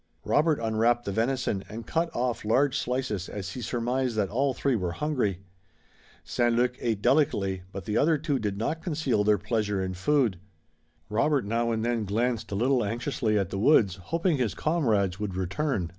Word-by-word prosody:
Robert 155 0 +2
unwrapped 115 +2 +1
the 100 - -2
venison 115 -2 0
and 115 +1 -7
cut 165 +6 0
off 120 -1 -1
large 130 +6 +2
slices 125 -8 -2
as 95 -2 -5
he 125 - -6
surmised 125 +1 -1
that 105 -3 0
all 135 +5 +1
three 135 0 0
were 90 -5 -2
hungry. 110 - -1 0.8
St. 120 -1 +1
Luc 125 +1 +2
ate 110 -4 -2
delicately 95 -10 +2
but 95 -3 -7
the 105 - -1
other 155 +1 +3
two 145 -2 -1
did 105 -3 -2
not 155 +10 -2
conceal 145 - 0
their 105 0 +4
pleasure 105 -1 -1
in 95 0 -2
food. 110 0 +1 0.7
Robert 130 +4 +1
now 115 +2 0
and 110 0 -1
then 120 -2 0
glanced 115 +3 -1
a - - -2
little 125 +4 +2
anxiously 115 0 -1
at 100 -4 -1
the 95 - -2
woods, 100 - +4
hoping 165 -1 +1
his 120 -5 -1
comrades 110 - +1
would 105 -3 -3
return. 95 - -1
115 Hz, 180 wpm, -27 LUFS, 100-135 Hz, 0.8 s, their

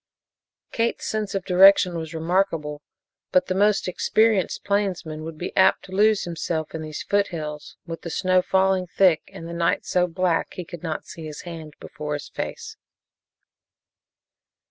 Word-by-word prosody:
Kate's 230 0 -1
sense 215 -2 -2
of 195 - -2
direction 185 -1 +6
was 165 0 -5
remarkable, 160 -3 0 0.5
but 185 - +4
the 185 - -1
most 205 +1 +2
experienced 215 +1 +1
plainsman 180 -6 -1
would 160 0 -7
be 175 - -5
apt 190 - +4
to 185 - -14
lose 210 +2 +3
himself 165 -2 -3
in 160 - -4
these 155 -1 -6
foothills, 160 -7 -2
with 165 -1 -7
the 170 - -6
snow 185 +2 +2
falling 190 0 +2
thick 180 -2 +3
and 165 - -9
the 170 - -6
night 170 0 0
so 180 -1 +2
black 175 -1 -1
he 180 - -6
could 175 -1 -9
not 160 -3 -4
see 160 -2 -9
his 150 - -8
hand 160 -3 -9
before 150 0 -6
his 145 - -7
face. - - -6
175 Hz, 160 wpm, -24 LUFS, 160-190 Hz, 0.5 s, direction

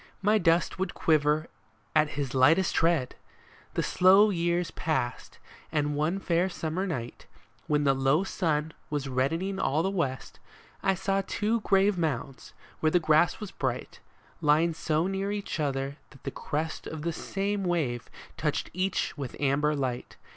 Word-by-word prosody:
My 210 +2 +4
dust 170 0 +2
would 190 - -2
quiver 155 0 +2 0.5
at 155 0 +4
his 140 -3 -2
lightest 160 +8 +4
tread! 165 -6 +2 0.3
" - - -27
The - - +1
slow 195 +3 +5
years 175 -1 0
passed; 140 -7 -2 0.3
and 150 -1 0
one 155 +6 0
fair 180 -1 +1
summer 175 +2 -3
night, 120 -9 -5 0.4
When 150 -1 +2
the 135 -1 +4
low 135 +6 +2
sun 160 -5 -1 0.2
was 145 -2 -2
reddening 165 +10 -1
all 150 +4 +1
the 190 - 0
west, 140 -9 -3 0.4
I 195 - +2
saw 195 +1 0
two 220 +2 0
grave 195 -2 +2
mounds, 135 -4 -3 0.3
where 155 - +3
the 180 - +4
grass 155 +1 +3
was 210 -3 -6
bright, 130 -2 -3 0.4
Lying 155 +3 +3
so 160 0 0
near 195 +1 -1
each 205 -4 -4
other 140 -1 -2
that 135 - -18
the - - -3
crest 155 +2 -4
Of 155 -1 -6
the 170 0 -1
same 200 +3 -2
wave 150 -10 -1 0.3
touched 150 -2 -1
each 185 -1 -1
with 135 -4 -5
amber 145 +2 +2
light. 130 -3 -3
160 Hz, 160 wpm, -28 LUFS, 145-185 Hz, 0.5 s, slow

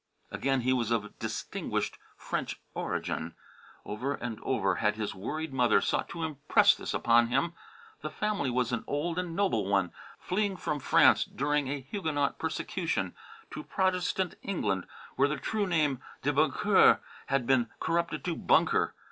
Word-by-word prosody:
Again, 135 -1 0
he 130 +2 +2
was 120 -3 0
of 105 -3 -2
distinguished - - -3 0.2
French - - -3
origin. 80 +1 -3 0.5
Over 130 +7 -2
and 115 -3 -5
over 100 -8 0
had 105 0 +1
his 110 -1 -3
worried 155 +10 -4
mother 125 -5 +4
sought - - -1
to 170 -1 -5
impress 150 -3 +4
this - - -4
upon 120 0 +4
him. 135 +8 0 0.5
The 155 - -4
family 200 -3 -1
was 125 0 0
an 120 - -1
old 165 +4 -1
and 175 -2 -4
noble 115 - +1
one, 95 -3 +2 0.3
fleeing 195 0 -1
from 150 -3 -2
France, - - +5
during 145 0 0
a 140 +1 -3
Huguenot 145 -1 -2
persecution, - - -2 0.4
to - - -5
Protestant 185 -1 0
England 95 - -1 0.3
where 135 +2 +4
the 150 0 -2
true 205 +9 -1
name 150 -7 +1 0.2
"de - - +1
Boncoeur" - - +5 0.3
had 135 -3 +1
been 120 -3 +3
corrupted 170 +1 -1
to 175 -2 -1
"Bunker." - - +2
140 Hz, 155 wpm, -30 LUFS, 120-170 Hz, 0.5 s, France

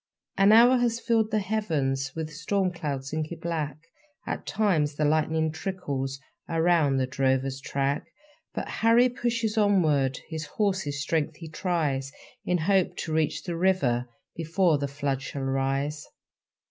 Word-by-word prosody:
An 195 +1 +5
hour 240 +3 +7
has 235 -1 +1
filled 230 -2 +1
the 215 - +1
heavens 155 -11 -1
With 160 -1 -4
storm 185 +4 0
clouds 140 -5 -4
inky 155 +1 -2
black; 160 -4 -3 0.5
At - - -4
times 160 -9 +1
the 150 - 0
lightning 155 +1 +1
trickles 145 -6 -4 0.3
Around 165 -4 +3
the 130 - +2
drover's 130 0 0
track; 140 +1 -1 0.4
But - - -4
Harry 230 +3 +5
pushes 230 -3 -1
onward, 155 -11 +3
His 160 -1 -5
horses' 190 -9 0
strength 160 -1 -1
he 165 +1 -9
tries, 155 -6 -1 0.3
In 180 - +1
hope 185 +2 +1
to 160 - -3
reach 155 -1 0
the 175 -2 -4
river 140 -10 +1 0.3
Before 165 -1 +2
the 140 - -1
flood 140 -1 -2
shall 135 0 -5
rise. 135 +2 -1
160 Hz, 145 wpm, -27 LUFS, 140-190 Hz, 0.5 s, hour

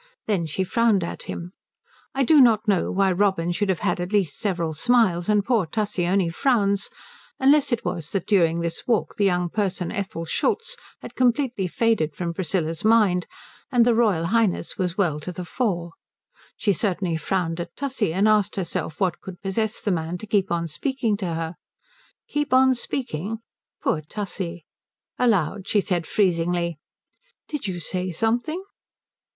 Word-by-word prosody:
Then 190 -6 0
she 165 +5 -1
frowned 220 -1 +2
at 170 - -5
him. 175 +1 -5 0.6
I 270 - +2
do 295 +2 +6
not 220 -4 +4
know 195 -4 +2
why 195 0 +2
Robin 185 -2 +1
should 200 +3 -1
have 185 - 0
had - - 0
at 175 +2 -4
least 195 -8 0
several 170 -6 -1
smiles 190 -2 +2
and 210 -1 +3
poor 225 -7 +2
Tussie 205 -1 -1
only 185 -1 +2
frowns, 200 -1 +1 0.5
unless 280 +1 +4
it 235 - -1
was 165 -2 -3
that 195 -3 -2
during 170 -4 +3
this 170 0 -4
walk 230 -4 +1
the 205 - +2
young 180 -2 +2
person 190 -2 -2
Ethel 195 -5 -4
Schultz 465 - -1 0.3
had - - -8
completely 250 -5 +1
faded 180 -7 +1
from 170 -1 -3
Priscilla's 165 -2 -2
mind 210 -5 +4 0.4
and 240 -3 +5
the 240 - +4
Royal 210 -8 +2
Highness 210 -2 +1
was 180 -2 -2
well 170 -7 +1
to 165 +4 -6
the 180 0 -6
fore. 175 -5 -1 0.7
She 205 - +2
certainly 185 -2 -1
frowned 165 +1 -1
at 170 0 -6
Tussie 260 - -1
and 195 +5 +2
asked 210 -2 +3
herself 170 -4 -3
what 185 -4 0
could 185 -2 -9
possess 215 +3 -1
the 205 - 0
man 165 0 -2
to 200 - -9
keep 200 -3 +1
on 170 -1 0
speaking 230 - -1
to 195 -3 -3
her. 165 +1 -4 0.7
Keep 295 -3 -1
on 260 0 +6
speaking! 225 - -3 0.5
Poor 155 - +1
Tussie. 175 -1 -5 0.5
Aloud 200 -5 +1
she 210 - +3
said 180 -4 -1
freezingly, 170 -4 +1 0.7
"Did 295 -8 -4
you 180 -2 -3
say 185 +2 -3
something?" 240 - -1
195 Hz, 170 wpm, -24 LUFS, 170-225 Hz, 0.7 s, do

